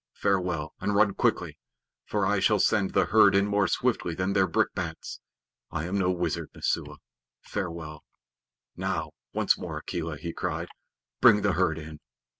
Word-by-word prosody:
Farewell; 90 Hz, -6 st, -1 dB
and 100 Hz, +1 st, -1 dB
run 100 Hz, -1 st, +4 dB
quickly, -, -, 0 dB, 0.5 s
for 105 Hz, -2 st, 0 dB
I 105 Hz, +1 st, +2 dB
shall 105 Hz, +2 st, +3 dB
send 100 Hz, -1 st, +2 dB
the -, -, +3 dB
herd -, -, +5 dB
in 100 Hz, 0 st, +4 dB
more 100 Hz, -1 st, +2 dB
swiftly 85 Hz, -1 st, 0 dB
than 95 Hz, +2 st, -1 dB
their 95 Hz, -1 st, +3 dB
brickbats. 80 Hz, -, -2 dB, 0.5 s
I 80 Hz, 0 st, -3 dB
am 90 Hz, +3 st, -3 dB
no 90 Hz, -1 st, +2 dB
wizard, 85 Hz, -3 st, -2 dB
Messua. -, -, -2 dB, 0.4 s
Farewell!" 85 Hz, -6 st, -5 dB, 0.7 s
"Now, -, -, -2 dB, 0.2 s
once -, -, +2 dB
more, -, -, -5 dB
Akela," 80 Hz, -3 st, -4 dB
he 85 Hz, +3 st, -6 dB
cried. -, -, -3 dB, 0.5 s
"Bring 105 Hz, 0 st, +6 dB
the 100 Hz, -2 st, +2 dB
herd 85 Hz, -2 st, +1 dB
in." 75 Hz, -1 st, -9 dB
90 Hz, 155 wpm, -27 LUFS, 80-100 Hz, 0.7 s, Bring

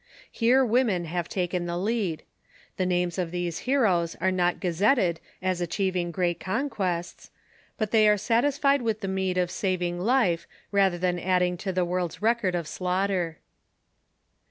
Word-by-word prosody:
Here 255 Hz, +3 st, +3 dB
women 220 Hz, -7 st, +1 dB
have 170 Hz, +1 st, -3 dB
taken 180 Hz, -1 st, -2 dB
the 170 Hz, 0 st, -2 dB
lead. 195 Hz, -4 st, -1 dB, 0.5 s
The 185 Hz, -, 0 dB
names 180 Hz, 0 st, 0 dB
of 175 Hz, -2 st, -1 dB
these 175 Hz, -1 st, -3 dB
heroes 190 Hz, -11 st, +2 dB
are 190 Hz, -, 0 dB
not 180 Hz, -1 st, +1 dB
gazetted 180 Hz, 0 st, +2 dB, 0.2 s
as 185 Hz, -1 st, 0 dB
achieving 180 Hz, 0 st, -1 dB
great 175 Hz, 0 st, -1 dB
conquests; 190 Hz, -7 st, -3 dB, 0.5 s
but 215 Hz, -3 st, -2 dB
they 215 Hz, -2 st, +5 dB
are 210 Hz, -, +4 dB
satisfied 275 Hz, +6 st, +2 dB
with 220 Hz, -2 st, -1 dB
the 195 Hz, -, -3 dB
meed 190 Hz, -1 st, -1 dB
of 180 Hz, -1 st, +1 dB
saving 180 Hz, -2 st, -1 dB
life 195 Hz, -5 st, +1 dB, 0.2 s
rather 195 Hz, -3 st, +3 dB
than 180 Hz, 0 st, 0 dB
adding 180 Hz, 0 st, +1 dB
to 190 Hz, +2 st, -3 dB
the 180 Hz, -1 st, 0 dB
world's 175 Hz, -1 st, -2 dB
record 215 Hz, -4 st, +1 dB
of 170 Hz, -3 st, -3 dB
slaughter. 180 Hz, -1 st, -1 dB
185 Hz, 155 wpm, -26 LUFS, 175-210 Hz, 0.5 s, they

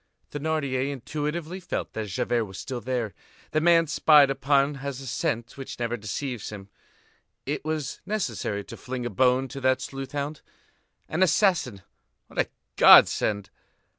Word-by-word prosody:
Thénardier 140 Hz, -3 st, -1 dB
intuitively 150 Hz, +6 st, -4 dB
felt 185 Hz, -, -4 dB
that 110 Hz, -1 st, -4 dB
Javert 115 Hz, +5 st, 0 dB
was 95 Hz, -2 st, -10 dB
still 130 Hz, -3 st, -5 dB
there; 120 Hz, -5 st, -2 dB, 0.4 s
the 155 Hz, -, +1 dB
man 165 Hz, 0 st, +5 dB
spied 150 Hz, -2 st, +5 dB
upon 140 Hz, +1 st, +2 dB
has 140 Hz, -1 st, -4 dB
a 135 Hz, -, -9 dB
scent 120 Hz, -1 st, -2 dB
which 135 Hz, -, -7 dB
never 120 Hz, 0 st, -2 dB
deceives 120 Hz, +2 st, -4 dB
him; 100 Hz, -2 st, -9 dB, 0.8 s
it 145 Hz, +2 st, -3 dB
was 155 Hz, -3 st, -3 dB
necessary 120 Hz, -, -2 dB
to -, -, -10 dB
fling 125 Hz, -1 st, -5 dB
a 120 Hz, -, -3 dB
bone 130 Hz, +5 st, +3 dB
to 135 Hz, -, -7 dB
that 130 Hz, 0 st, +3 dB
sleuth 135 Hz, 0 st, -7 dB
hound. 145 Hz, +1 st, -3 dB, 0.7 s
An 160 Hz, -, -2 dB
assassin, 170 Hz, -, +2 dB, 0.4 s
what -, -, -8 dB
a -, -, +3 dB, 0.3 s
godsend! 100 Hz, -2 st, +6 dB
135 Hz, 150 wpm, -26 LUFS, 120-150 Hz, 0.8 s, godsend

